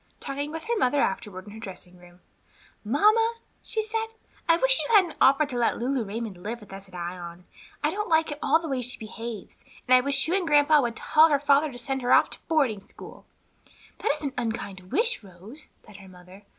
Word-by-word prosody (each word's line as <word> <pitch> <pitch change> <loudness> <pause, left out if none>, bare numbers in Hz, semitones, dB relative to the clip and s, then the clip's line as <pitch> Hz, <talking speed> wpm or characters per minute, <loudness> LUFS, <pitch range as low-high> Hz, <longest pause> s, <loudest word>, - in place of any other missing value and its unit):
Talking 285 +2 -4
with 325 0 -6
her 470 +1 -1
mother 280 -1 +2
afterward 205 -8 -2
in 205 - -11
her 220 - -10
dressing 185 -3 -9
room, 175 0 -18 0.6
"Mamma," 430 - +3 0.3
she 440 - -2
said, 445 +1 -2 0.4
"I 330 - +6
wish - - +4
you 460 - +1
hadn't 370 -5 +4
offered 275 +2 +5
to 245 -3 -3
let 235 - +1
Lulu 255 +1 -1
Raymond 210 -3 -6
live 225 +5 -5
with 205 -3 -14
us 195 0 -9
at 180 - -14
Ion. 175 0 -7 0.4
I - - +2
don't 420 +1 -3
at 320 -2 +2
all - - -2
like 325 - +4
the - - -4
way 265 -3 -2
she 250 +1 -3
behaves, 225 -1 -8 0.2
and 255 - +4
I 255 - +7
wish 280 +3 0
you 340 - 0
and 380 -3 +1
grandpa 295 0 +5
would 235 -3 -2
tell 315 +7 +4
her 290 -2 +2
father 285 +1 +3
to 245 - -10
send 265 +2 -2
her 245 - -1
off - - +5
to - - -9
boarding 275 - +1
school." - - -13 0.7
"That - - +1
is 300 +1 -8
an 280 -2 -3
unkind 200 -6 -5
wish, 455 - +1
Rose," 200 - -13 0.2
said 205 - -14
her 195 -1 -13
mother. 185 +2 -16
255 Hz, 220 wpm, -26 LUFS, 205-310 Hz, 0.7 s, I